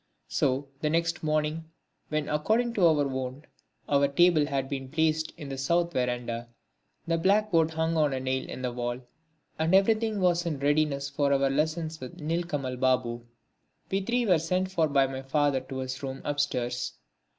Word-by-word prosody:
So 135 Hz, +2 st, 0 dB
the 150 Hz, -, 0 dB
next 165 Hz, +1 st, 0 dB
morning, 155 Hz, +1 st, 0 dB, 0.4 s
when 155 Hz, -1 st, -1 dB
according 220 Hz, +11 st, +1 dB
to 185 Hz, -6 st, +4 dB
our 150 Hz, -3 st, +3 dB
wont 130 Hz, +2 st, -4 dB, 0.4 s
our 140 Hz, 0 st, +3 dB
table 155 Hz, +1 st, +4 dB
had 135 Hz, -2 st, -1 dB
been 135 Hz, -1 st, -5 dB
placed 160 Hz, +1 st, +1 dB
in 150 Hz, -4 st, -7 dB
the 135 Hz, -1 st, -5 dB
south 170 Hz, +5 st, +1 dB
verandah, 120 Hz, -2 st, -2 dB, 0.6 s
the 165 Hz, 0 st, 0 dB
blackboard 190 Hz, -3 st, +3 dB
hung 160 Hz, 0 st, -1 dB
up 155 Hz, -1 st, +4 dB
on 145 Hz, -, -1 dB
a 130 Hz, -, -1 dB
nail 130 Hz, 0 st, -2 dB
in 130 Hz, -, -6 dB
the 125 Hz, -, -1 dB
wall, 120 Hz, 0 st, -3 dB, 0.6 s
and 160 Hz, +3 st, +3 dB
everything 215 Hz, +2 st, +3 dB
was 175 Hz, -2 st, +2 dB
in 165 Hz, -4 st, -2 dB
readiness 145 Hz, 0 st, +1 dB
for 140 Hz, 0 st, 0 dB
our 135 Hz, 0 st, +3 dB
lessons 155 Hz, +2 st, -1 dB
with 130 Hz, -1 st, -9 dB
Nilkamal 150 Hz, -5 st, -2 dB
Babu, 125 Hz, -2 st, 0 dB, 0.6 s
we 195 Hz, +1 st, +1 dB
three 240 Hz, +4 st, 0 dB
were 180 Hz, -6 st, +4 dB
sent 185 Hz, +4 st, -1 dB
for 165 Hz, -4 st, +2 dB
by 140 Hz, -2 st, +3 dB
my 135 Hz, 0 st, -5 dB
father 140 Hz, 0 st, +1 dB
to 130 Hz, +1 st, -8 dB
his 130 Hz, +1 st, -4 dB
room 135 Hz, -1 st, -5 dB
upstairs. 125 Hz, -4 st, -1 dB
150 Hz, 175 wpm, -28 LUFS, 135-165 Hz, 0.6 s, to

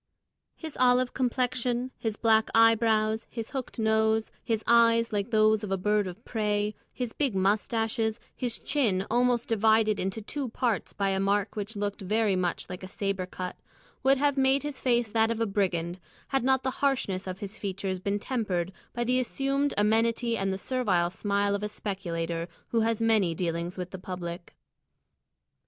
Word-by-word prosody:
His 320 Hz, -3 st, -7 dB
olive 250 Hz, 0 st, +4 dB
complexion, 250 Hz, 0 st, 0 dB
his 220 Hz, -2 st, -2 dB
black 220 Hz, -1 st, +3 dB
eyebrows, 225 Hz, -1 st, +4 dB
his 230 Hz, -2 st, -6 dB
hooked 265 Hz, -3 st, -5 dB
nose, 220 Hz, 0 st, +2 dB
his 225 Hz, -2 st, -1 dB
eyes 230 Hz, -1 st, +4 dB
like 205 Hz, +2 st, -1 dB
those 215 Hz, -1 st, +3 dB
of 210 Hz, -, -4 dB
a 195 Hz, -, +1 dB
bird 210 Hz, +1 st, +1 dB
of 185 Hz, +7 st, -9 dB
prey, 210 Hz, -2 st, 0 dB, 0.2 s
his 245 Hz, -3 st, -4 dB
big 275 Hz, -8 st, 0 dB
moustaches, 220 Hz, +3 st, 0 dB, 0.2 s
his 245 Hz, -2 st, -1 dB
chin 215 Hz, -10 st, 0 dB
almost 245 Hz, 0 st, +2 dB
divided 220 Hz, -1 st, +3 dB
into 190 Hz, +4 st, -2 dB
two 260 Hz, +5 st, -4 dB
parts 235 Hz, -3 st, -1 dB
by 195 Hz, 0 st, -1 dB
a 190 Hz, 0 st, 0 dB
mark 200 Hz, +1 st, +1 dB
which 210 Hz, +1 st, -4 dB
looked 205 Hz, 0 st, -3 dB
very 210 Hz, +1 st, +1 dB
much 180 Hz, -2 st, -1 dB
like 180 Hz, 0 st, -7 dB
a 185 Hz, -, -7 dB
sabre 195 Hz, -2 st, -2 dB
cut, 185 Hz, 0 st, -6 dB, 0.4 s
would 270 Hz, +1 st, +4 dB
have 285 Hz, 0 st, +1 dB
made 270 Hz, +1 st, +3 dB
his 290 Hz, -3 st, -5 dB
face 240 Hz, -2 st, +2 dB
that 225 Hz, 0 st, +3 dB
of 230 Hz, -1 st, -1 dB
a 230 Hz, -, +2 dB
brigand, 180 Hz, -4 st, -1 dB, 0.3 s
had 270 Hz, -3 st, +1 dB
not 265 Hz, 0 st, +3 dB
the 260 Hz, -, 0 dB
harshness 255 Hz, -9 st, 0 dB
of 185 Hz, 0 st, -4 dB
his 200 Hz, 0 st, -7 dB
features 190 Hz, -1 st, -3 dB
been 200 Hz, +2 st, -1 dB
tempered 200 Hz, -7 st, -2 dB, 0.2 s
by 240 Hz, -, -1 dB
the 250 Hz, +2 st, +2 dB
assumed 275 Hz, +3 st, 0 dB
amenity 230 Hz, +3 st, +2 dB
and 195 Hz, -3 st, -1 dB
the 190 Hz, -, -2 dB
servile 195 Hz, -8 st, 0 dB
smile 200 Hz, +1 st, 0 dB
of 200 Hz, -, -1 dB
a 210 Hz, -, -2 dB
speculator 170 Hz, -5 st, -3 dB, 0.2 s
who 230 Hz, -, +1 dB
has 225 Hz, 0 st, +1 dB
many 210 Hz, -7 st, +3 dB
dealings 170 Hz, +1 st, -2 dB
with 180 Hz, -1 st, -5 dB
the 190 Hz, -, -7 dB
public. 180 Hz, -2 st, -6 dB
220 Hz, 175 wpm, -28 LUFS, 195-240 Hz, 0.4 s, olive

